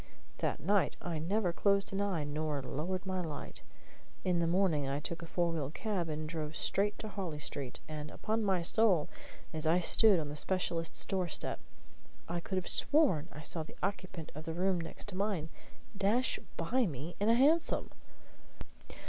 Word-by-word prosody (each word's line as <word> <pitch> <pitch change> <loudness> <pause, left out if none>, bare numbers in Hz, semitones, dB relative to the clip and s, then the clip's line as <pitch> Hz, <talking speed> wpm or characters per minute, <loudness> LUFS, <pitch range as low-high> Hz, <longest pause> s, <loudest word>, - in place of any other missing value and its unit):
That - - 0
night 200 +2 +2
I 170 -3 -3
never 180 +2 +1
closed 200 +1 +2
an 195 - 0
eye 190 -6 0
nor 150 0 -2
lowered 175 +9 -3
my 185 -1 -1
light. 155 -5 -6 0.6
In 180 -2 +2
the 170 - +2
morning 170 -5 +2
I 140 +1 0
took 170 +3 -4
a 165 - -7
four 170 0 +1
wheel 150 -5 -2
cab 180 0 -2
and 155 0 -3
drove 155 -1 -4
straight 205 +1 +1
to 220 - -6
Harley 185 -7 -4
Street; 140 -3 -4
and, 155 -1 -5
upon 220 +5 -1
my 190 -4 +2
soul, 185 -4 +3 0.4
as 155 0 -2
I 165 +2 +5
stood 200 +2 +5
on 150 -2 -3
the 145 - -5
specialist's 170 0 +2
door 185 -2 0
step, 160 - -1 0.7
I 175 +1 -2
could 190 - -4
have 185 -1 -1
sworn 265 - +3
I 150 - -9
saw 165 - -1
the 155 - -10
occupant 185 -4 -3
of 155 +2 -8
the 160 - -3
room 185 0 +1
next 165 +4 -6
mine 185 -5 -1 0.5
dash 210 +6 +2 0.2
by 255 -3 +2
me 155 +2 -5
in 205 +2 +2
a 230 - +6
hansom! 300 +7 +3
175 Hz, 180 wpm, -33 LUFS, 155-200 Hz, 0.7 s, a